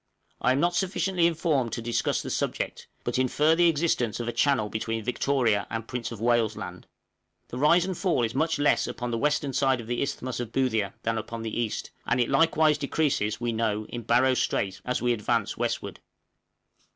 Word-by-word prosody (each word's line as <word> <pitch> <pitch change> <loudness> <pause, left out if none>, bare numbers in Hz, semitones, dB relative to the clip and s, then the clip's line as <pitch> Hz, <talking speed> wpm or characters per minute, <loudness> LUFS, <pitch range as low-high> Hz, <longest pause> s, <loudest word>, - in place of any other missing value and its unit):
I - - +3
am 135 - 0
not 175 +3 +2
sufficiently 185 -1 +1
informed 155 -7 0
to - - -3
discuss 120 0 0
this - - -2
subject, - - -3 0.2
but - - -1
infer 150 +5 +3
the 170 +1 +5
existence 145 -9 0
of 120 - -3
a - - 0
channel 120 -2 +2
between 110 +1 -3
Victoria 125 -4 +1
and 115 0 -4
Prince 125 -1 -4
of 115 - -7
Wales' 115 -2 +2
Land. - - -8 0.6
The 125 - -6
rise 170 +5 +5
and 190 -1 -3
fall 170 -9 +1
is 115 0 -1
much 160 +4 +1
less 145 0 +2
upon 120 0 -4
the 115 - -1
western 145 -1 0
side 135 -1 +2
of 115 - -7
the 120 +1 -2
Isthmus 130 -3 -3
of 120 -2 -4
Boothia 110 -7 0
than 115 0 0
upon 115 +1 -6
the 110 - -4
east, 115 -2 -2 0.2
and 120 - +2
it 120 - +2
likewise 155 +1 +3
decreases, 140 -7 0
we 120 -1 -1
know, 110 -1 -1
in 120 - -5
Barrow 125 +3 +3
Strait, 95 -5 -1
as 125 -1 -1
we 120 0 +3
advance 105 -3 -1
westward. - - -3
125 Hz, 200 wpm, -27 LUFS, 115-150 Hz, 0.6 s, the